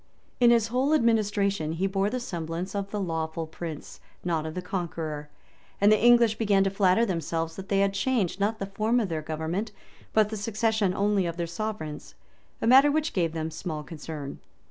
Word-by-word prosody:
In 240 -1 +6
his 230 -2 +4
whole 265 +6 +2
administration, 205 - +1
he 175 +4 -1
bore 195 +1 +1
the 255 +3 -2
semblance 170 -3 -4
of 200 -1 -3
the 210 - -3
lawful 165 -3 -2
prince, 160 -1 -8 0.2
not 165 -3 -1
of 155 - -6
the 180 - -3
conqueror; 160 -5 -4 0.5
and 205 +1 +5
the 215 0 +3
English 235 -2 +5
began 200 -3 +3
to 195 - 0
flatter 195 +3 +3
themselves, 165 -4 -2
that 195 0 -9
they 195 -1 +3
had 200 0 +2
changed, 200 -3 0
not 210 +3 +1
the 195 - -3
form 215 +5 0
of 215 -5 -1
their 160 -2 -2
government, 160 +7 -3 0.4
but 215 -1 +3
the 220 - -4
succession 215 -2 0
only 200 -2 +1
of 170 0 -4
their 170 - -1
sovereigns; 170 -4 -5 0.5
a - - +2
matter 265 +5 +7
which 310 +1 0
gave 170 -4 0
them 160 0 -3
small 155 -2 -5
concern. 150 -3 -7
195 Hz, 190 wpm, -27 LUFS, 165-215 Hz, 0.5 s, matter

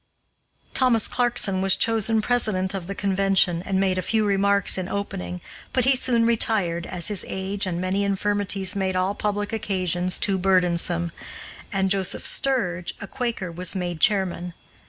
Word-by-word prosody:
Thomas 250 -4 +3
Clarkson 235 -6 +1
was 195 -1 +4
chosen 225 -1 +1
president 210 -6 +1
of 185 -3 -5
the 200 - -5
convention 195 -3 +1
and 190 +1 -2
made 190 -1 +1
a - - 0
few 220 +2 0
remarks 200 -1 +2
in 185 0 -4
opening, 90 - -5 0.3
but 255 -2 +2
he 265 0 +4
soon 240 -2 +4
retired, 200 -7 0
as 180 +2 +1
his 205 -3 +1
age 190 +1 -3
and 175 -2 -3
many 185 +2 -1
infirmities 200 -1 -1
made 190 -1 -1
all 185 +2 0
public 205 +1 -3
occasions 185 -4 -2
too 195 -2 +2
burdensome, 175 -2 +1 0.6
and 190 -2 0
Joseph 195 -1 0
Sturge, 185 -10 -1
a - - -6
Quaker, 230 -6 -4
was 180 +3 0
made 175 -3 -3
chairman. 180 -2 0
195 Hz, 155 wpm, -23 LUFS, 180-210 Hz, 0.6 s, was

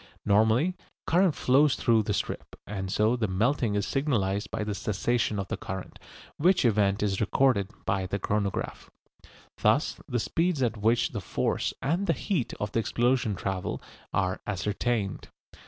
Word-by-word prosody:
Normally, 110 - +3 0.3
current 180 -1 +3
flows 135 +2 +4
through 115 -2 +3
the 105 0 -1
strip, - - -4
and 95 -2 -4
so 110 +4 +3
the 115 -3 0
melting 110 +3 +1
is 100 0 0
signalised 105 -9 0
by 110 - -3
the 105 -1 -2
cessation 105 +3 0
of 100 -1 -3
the - - -2
current, 95 -1 -7 0.4
which 180 0 +3
event 105 -3 +2
is 100 -1 0
recorded 105 -2 +2 0.2
by 95 -1 0
the 100 - -2
chronograph. 100 0 -2 0.7
Thus - - +2
the 120 - -1
speeds 165 +3 0
at 120 -2 +1
which 115 +3 +2
the 105 - -4
force 80 - -1
and 170 +8 0
the 165 - +4
heat 150 - -1
of 105 -1 -3
the - - +1
explosion 120 -1 +1
travel 95 -1 -3 0.3
are 95 +1 0
ascertained. 105 +1 -1
110 Hz, 155 wpm, -28 LUFS, 100-130 Hz, 0.7 s, flows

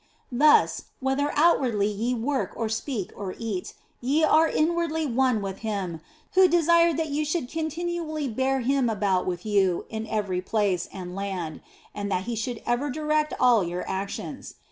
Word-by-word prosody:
Thus, 295 +5 +4
whether 270 +2 0
outwardly 260 -10 +3
ye 220 +4 -1
work 260 +4 -1
or 225 -1 -2
speak 225 -2 -3
or 195 -2 -5
eat, 215 -6 -4 0.3
ye 280 +6 +2
are 315 +1 +5
inwardly 320 0 0
one 255 -4 +1
with 195 -1 -5
Him 195 -7 -3 0.3
who 375 0 +7
desireth 335 -1 +4
that 320 -1 -1
ye 295 +2 0
should 305 -3 -1
continually 320 0 -3
bear 265 +3 0
Him 265 0 +2
about 195 -4 0
with 180 +1 -3
you 195 -4 +2
in 220 0 -4
every 200 -4 -1
place 190 -3 0
and 180 -2 -7
land, 190 -5 -4 0.3
and 205 -1 -4
that 185 0 0
He 235 +3 -3
should 225 +1 -4
ever 240 +5 0
direct 305 +1 0
all 235 -5 +5
your 175 +1 -4
actions. 195 +1 -5
240 Hz, 165 wpm, -26 LUFS, 200-300 Hz, 0.3 s, who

